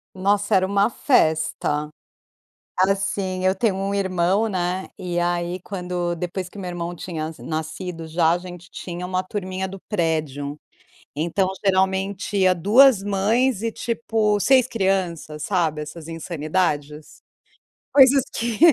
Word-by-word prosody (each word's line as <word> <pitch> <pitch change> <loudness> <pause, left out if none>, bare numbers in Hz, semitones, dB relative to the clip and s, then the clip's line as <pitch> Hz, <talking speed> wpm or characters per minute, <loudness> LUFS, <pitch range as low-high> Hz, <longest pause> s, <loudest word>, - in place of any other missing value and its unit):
Nossa, 200 +2 +1
era 190 0 +4
uma 200 +3 +2
festa. 155 - +1 0.9
Assim, 190 -1 0
eu 190 +1 +3
tenho 210 -1 +1
um 195 +1 -2
irmão, 190 +2 +1
né. 185 -1 -2
E 175 -2 -2
aí, 175 +1 -1
quando 180 -2 -3
depois 180 +2 -4
que - - -14
meu 190 -2 -5
irmão 175 0 -4
tinha 160 -3 -5
nascido, 160 +2 -5
já 160 0 +2
a 170 - +2
gente 180 0 -10
tinha 180 0 -6
uma 185 0 -1
turminha 190 -1 -4
do 195 +1 -8
prédio. 155 -6 -1 0.6
Então 175 +5 0 0.2
geralmente 190 +1 +1
ia 185 -1 +5
2 215 +6 +5
mães 205 +4 +1
e 230 - 0
tipo 220 -3 0
6 255 +3 +4
crianças, 185 - -1
sabe, 165 -6 0
essas 155 +1 -8
insanidades? 155 -2 -2 0.7
Coisas 270 -1 +7
que 230 -1 -2
185 Hz, 130 wpm, -23 LUFS, 170-200 Hz, 0.9 s, Coisas